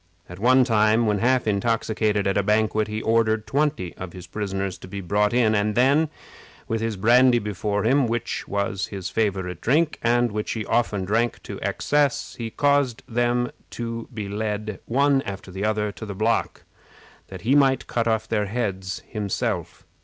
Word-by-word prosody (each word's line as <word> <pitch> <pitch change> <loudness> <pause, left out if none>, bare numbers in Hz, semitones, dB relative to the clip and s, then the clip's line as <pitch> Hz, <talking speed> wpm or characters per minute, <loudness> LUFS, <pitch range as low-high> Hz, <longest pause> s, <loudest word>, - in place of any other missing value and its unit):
At 90 +1 -10
one 130 +4 +5
time, 110 -1 +3
when 105 -2 +1
half 130 +3 +2
intoxicated 105 0 0
at 100 - +1
a 100 - +3
banquet, 105 +1 +1
he 110 +1 -4
ordered 110 -1 +2
twenty 145 - -1
of 90 -2 -7
his 90 -2 -9
prisoners 95 0 -4
to - - -10
be 100 +2 -6
brought 105 +3 +1
in, 120 -3 +3
and 105 0 +1
then, 140 +5 +3 0.6
with 115 0 -1
his 115 -2 -2
brandy 120 +4 +5
before 105 -1 -2
him, 135 +3 +3
which 115 +1 -3
was 100 -2 -2
his 95 -3 -6
favorite 95 -5 -1
drink, 155 +5 +1
and 120 0 +2
which 105 0 -3
he 110 -2 -4
often 105 -5 0
drank 115 +4 0
to - - -7
excess, 145 -3 0
he 115 -1 -5
caused 140 -2 +1
them 120 +1 0 0.2
to 115 -1 -5
be 110 -4 -5
led, 105 0 -3
one 140 +2 +3
after 95 -4 -7
another, 105 +2 -1
to 105 +3 -9
the 100 - -6
block, 110 +3 0 0.6
that 95 -2 -9
he 120 +7 +1
might 135 -3 +3
cut 115 -1 -1
off 110 -1 0
their 105 -2 0
heads 95 -4 -3
himself. 105 -3 -3
110 Hz, 175 wpm, -24 LUFS, 100-120 Hz, 0.6 s, one